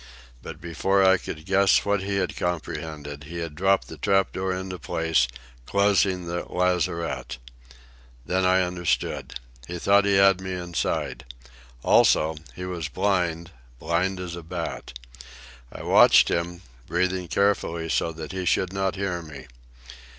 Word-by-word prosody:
But 75 +4 -9
before 95 +4 +1
I 95 0 +6
could 80 0 -7
guess 100 0 +3
what 100 -1 +1
he 100 +1 -2
had 95 -2 -1
comprehended, 75 -4 -4
he 85 +3 -7
had 85 -2 -4
dropped 95 +4 +2
the - - -10
trap 95 -1 +2
door 95 0 -2
into 95 0 -4
place, 80 -4 +1 0.4
closing 100 -2 +2
the 85 +1 -3
lazarette. 85 -7 -1 0.9
Then 95 +4 0
I 95 0 +4
understood. 90 -1 -2 0.3
He 90 - -5
thought 100 +3 +4
he 100 -1 +3
had 95 -1 +5
me 95 0 -4
inside. 85 -2 -3 0.6
Also, 80 +1 +4 0.2
he 90 - -6
was 90 -4 -4
blind, 90 -1 -1 0.3
blind 85 +6 -1
as 90 -2 -5
a 85 - -7
bat. 80 -6 -6 0.7
I - - -9
watched - - +6
him, 85 +1 -2 0.2
breathing 90 +1 0
carefully 85 -3 0
so 80 - 0
that 80 0 -8
he 95 -1 -4
should 95 +1 +1
not 95 0 -1
hear 95 -3 -2
me. 75 -5 -10
90 Hz, 145 wpm, -25 LUFS, 80-95 Hz, 0.9 s, I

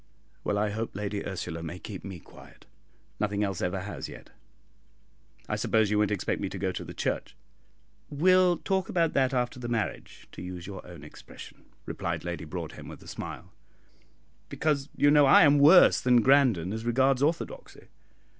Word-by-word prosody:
"Well, 105 - -1
I 105 0 0
hope 110 0 -4
Lady 100 0 -3
Ursula 90 -3 -5
may 85 +2 -6
keep 100 0 -9
me 95 -2 -7
quiet; - - -17 0.5
nothing 105 0 0
else 100 -3 -3
ever 90 +1 -2
has 105 +2 -6
yet. - - -12 1.2
I - - -1
suppose 110 -2 +1
you 105 - +2
won't 105 -2 +2
expect 105 -3 -2
me 95 - -2
to 95 - -7
go 95 0 -1
to - - -7
church?" - - -3 0.7
"We'll 180 +3 +4
talk 190 +1 -2
about 165 -2 +1
that 130 -2 +2
after 125 -1 -2
the 120 - -5
marriage, 110 -6 -4
to - - -10
use 90 -1 -7
your 100 0 -8
own 85 -4 -11
expression," 75 - -13 0.2
replied - - -4
Lady 85 -2 -5
Broadhem, 75 - -7
with - - -11
a - - -15
smile. - - -8 1.0
"Because, 145 -2 -1
you 145 - +4
know, 145 -1 +6
I - - +7
am 145 0 +5
worse 160 +6 +7
than 125 -2 +4
Grandon 125 -10 +3
as 110 0 -5
regards 130 +2 +2
orthodoxy. 170 - -3
110 Hz, 175 wpm, -28 LUFS, 95-140 Hz, 1.2 s, I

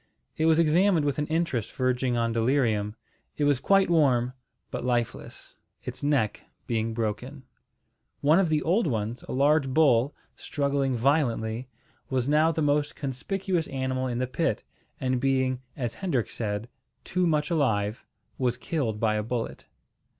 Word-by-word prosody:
It 160 - +1
was 160 -1 +5
examined 170 +1 +3
with 145 0 0
an 150 - -1
interest 160 -9 -1
verging 130 -1 0
on 115 0 +1
delirium. 115 -3 +1 0.4
It 150 - 0
was 145 -3 +3
quite 195 +6 +4
warm, 130 -7 +3 0.4
but - - -4
lifeless, 120 -2 -3 0.3
its - - -6
neck 140 -7 +1 0.2
being 115 -1 -1
broken. 125 +5 -3 0.8
One 155 +5 +5
of 185 -4 +2
the 155 -1 +1
old 180 +4 +2
ones, 115 -1 -2
a - - -3
large 140 +1 +3
bull, 135 -2 +3 0.2
struggling 140 -2 -1
violently, 120 -3 +1 0.4
was 130 -2 0
now 155 +3 +4
the 160 -1 -1
most 145 0 +1
conspicuous 170 +6 -2
animal 130 -1 -2
in 120 -2 -2
the 130 - 0
pit, 125 -2 -1 0.4
and 130 -1 0
being, 130 -1 +1 0.2
as 120 -4 -2
Hendrik 165 - -1
said, 105 0 -3 0.4
"too 180 -1 0
much 150 0 +1
alive," 110 -8 0 0.4
was 125 -2 +1
killed 125 - -2
by 110 -1 +2
a 105 - 0
bullet. 115 +2 -4
130 Hz, 150 wpm, -27 LUFS, 120-150 Hz, 0.8 s, was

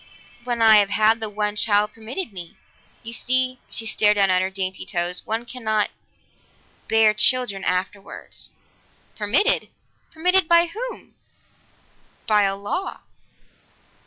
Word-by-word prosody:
"When 240 -2 -1
I 220 -1 +7
have 200 -1 +3
had 220 +2 +3
the 220 -1 -4
one 210 0 -2
child 210 0 +1
permitted 225 - -5
me. 175 -3 -9 0.5
You 230 0 -7
see" 255 +1 +1
she 225 - +1
stared 210 -1 +3
down 195 -2 +3
at 185 0 +3
her 190 - -1
dainty 190 -1 -5
toes 175 0 -2
"one 225 +2 -2
cannot 220 -4 -2 1.0
bear 220 -1 +4
children 215 -3 +2
afterwards." 190 +2 -4 0.7
"Permitted? 230 - +1 0.4
Permitted 360 +2 +2
by 340 0 +4
whom?" - - -7 1.1
"By 210 -2 +3
a 195 0 -1
law." 205 - -5
215 Hz, 130 wpm, -22 LUFS, 200-250 Hz, 1.1 s, I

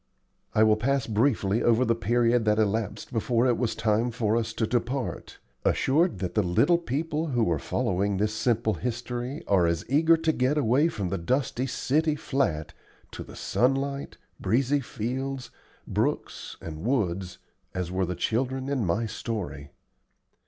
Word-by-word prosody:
I 110 - +6
will 110 -1 +5
pass 135 +2 +1
briefly 110 -2 +1
over 120 +2 +3
the 115 - +3
period 115 +1 +2
that 105 0 +3
elapsed 110 +1 -1
before 120 +1 +1
it 125 -2 +3
was 120 -1 -1
time 110 +2 +1
for 110 -2 0
us 115 -1 0
to 115 - 0
depart, 125 +3 -2 0.3
assured 165 +7 +2
that 90 -2 -3
the 105 - +3
little 100 - +3
people 160 +1 -2
who 120 - +1
are 80 - +1
following 95 +6 0
this 105 +2 0
simple 110 0 +1
history 125 - -4
are 90 -4 +3
as 85 0 -1
eager 160 +5 +4
to 160 0 +1
get 135 +1 +1
away 140 +3 +3
from 100 - -3
the 95 - -2
dusty 130 +6 0
city 155 +4 +1
flat 130 - -1 0.4
to - - -7
the - - -12
sunlight, 135 +2 0 0.2
breezy 130 +7 +2
fields, 130 +2 -4 0.3
brooks, - - -2
and 80 -2 -7
woods 95 -7 -1 0.4
as 90 -1 -2
were 95 -1 0
the 90 - -3
children 130 +8 -1
in 135 -4 0
my 100 +5 0
story. 95 - -5
115 Hz, 160 wpm, -27 LUFS, 105-135 Hz, 0.4 s, I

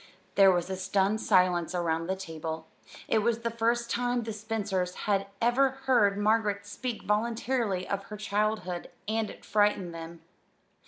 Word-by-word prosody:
There 195 -1 +7
was 175 -1 0
a - - -1
stunned 195 +3 +1
silence 180 -2 +3
around 165 -1 0
the 190 - 0
table. 160 -3 -6 0.4
It 225 - +3
was 230 +1 +1
the 230 0 -1
first 235 +1 0
time 245 0 0
the 220 0 -4
Spencers 205 -4 -2
had 195 -1 +1
ever 245 +4 +4 0.2
heard 210 -7 +4
Margaret 205 -1 +1
speak 230 +3 -5
voluntarily 220 -2 0
of 200 0 -3
her 210 - -8
childhood, 210 -3 -1 0.2
and 220 0 0
it - - -12
frightened 205 -4 +2
them. 165 0 -8
205 Hz, 155 wpm, -29 LUFS, 185-225 Hz, 0.4 s, There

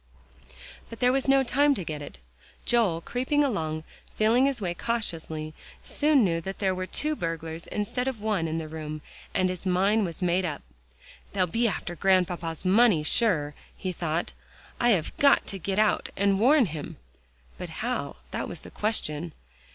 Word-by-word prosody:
But 230 - -9
there 250 0 +4
was 270 +1 0
no 270 0 +5
time 285 +3 +3
to 190 - -3
get 155 -2 -5
it. 145 - -8 0.5
Joel 210 -9 +2
creeping 260 - 0
along, 160 - -1 0.3
feeling 235 +5 +4
his 275 -3 -1
way 180 -4 -2
cautiously, 165 -8 -3 0.3
soon 295 -4 +3
knew 165 -2 0
that 195 +3 -6
there 190 -2 +1
were 185 0 -4
two 305 +8 -1
burglars 165 - -4
instead 230 +5 -2
of 260 -4 -2
one 205 -6 0
in 160 +1 -2
the 160 -1 -4
room, 155 -1 -6 0.3
and 185 - +3
his 185 -1 -4
mind 195 +3 +2
was 170 +1 -5
made 180 +1 +2
up. 155 -5 -3 0.7
"They'll 190 -2 +2
be 230 +8 +1
after 175 -3 -3
Grandpapa's 180 -3 +1
money, 195 -4 +5
sure," 155 -6 +1 0.2
he 185 - -3
thought. 160 - -2 0.5
"I 240 - +3
have 185 -9 +1
got 280 -1 +5
to 195 - -5
get 190 +3 -2
out, 215 -1 +2
and 195 0 +2
warn 265 +4 +5
him." 155 -5 -6 0.6
But - - -5 0.2
how? - - -2 0.2
that - - -3
was - - -7
the - - -12
question. 170 -7 -1
190 Hz, 175 wpm, -27 LUFS, 165-235 Hz, 0.7 s, no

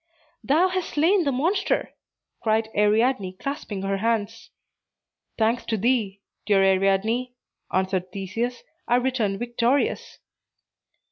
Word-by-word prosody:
"Thou 330 +7 +3
hast 370 -1 -3
slain 340 +4 +3
the 280 - +2
monster," 345 +10 0 0.5
cried 220 0 +1
Ariadne, 210 -1 +2
clasping 215 -3 -5
her 195 0 -1
hands. 225 +1 -2 0.9
"Thanks 225 +2 +1
to 220 - -1
thee, 210 -3 0 0.3
dear 200 -2 +4
Ariadne," 195 +6 +1 0.4
answered 185 -1 -1
Theseus, 215 +6 -4 0.2
"I 240 - +3
return 245 -6 0
victorious." 240 +4 0
225 Hz, 110 wpm, -24 LUFS, 195-255 Hz, 0.9 s, dear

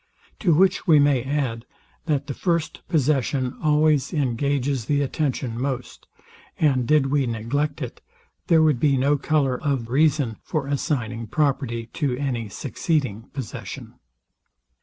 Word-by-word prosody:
To 175 -7 +3
which 190 +4 +3
we 160 -3 +7
may 145 -3 +4
add, 130 -4 -2 0.4
that 145 -3 0
the 140 - -4
first 170 +1 -1
possession 135 -4 +1
always 150 -2 +3
engages 140 -2 0
the 145 +2 +1
attention 130 -5 -2
most; 130 -2 -4 0.5
and 130 -6 +2
did 145 -3 +3
we 140 -3 +2
neglect 125 +7 -2
it, 125 - -8 0.5
there 160 -2 +5
would 150 -6 +3
be 140 0 +3
no 140 +3 +3
colour 140 -3 0
of 135 -6 -1
reason 140 -5 +2
for 150 -3 -2
assigning 120 -5 -2
property 130 -3 0
to 140 -6 -1
any 125 -6 -2
succeeding 130 - -2
possession. 135 -6 -7
140 Hz, 135 wpm, -23 LUFS, 125-150 Hz, 0.5 s, we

